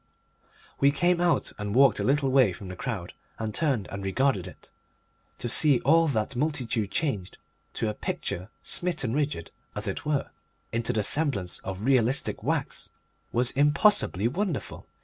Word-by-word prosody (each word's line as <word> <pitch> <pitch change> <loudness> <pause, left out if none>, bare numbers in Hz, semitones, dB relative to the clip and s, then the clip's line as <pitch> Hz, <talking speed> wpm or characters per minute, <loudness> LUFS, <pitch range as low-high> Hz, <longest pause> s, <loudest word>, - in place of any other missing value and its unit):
We 140 - +5
came 175 +5 +2
out 175 -1 +2
and 105 +1 -3
walked 135 0 +5
a - - 0
little 135 0 +2
way 130 -8 +5
from 95 +1 -9
the 90 - -6
crowd, 100 -5 -4 0.2
and 110 -1 -3
turned 135 -10 0
and 100 0 -5
regarded 95 -1 +1
it. - - -14 0.7
To - - -4
see 140 +2 +4
all 165 +4 +4
that 115 -2 -1
multitude 125 -7 -1
changed, 100 - -2 0.4
to 110 - -1
a 105 - -1
picture, 95 -2 -4
smitten 170 -10 -1
rigid, 145 - -2 0.2
as - - -2
it - - -3
were, 150 -2 -1 0.4
into 115 +1 0
the 110 -3 0
semblance 125 - 0
of 95 +3 -5
realistic 130 0 +2
wax, - - -2 0.4
was 120 +1 +2
impossibly 145 - +3
wonderful. 175 - -3
125 Hz, 155 wpm, -27 LUFS, 105-145 Hz, 0.7 s, We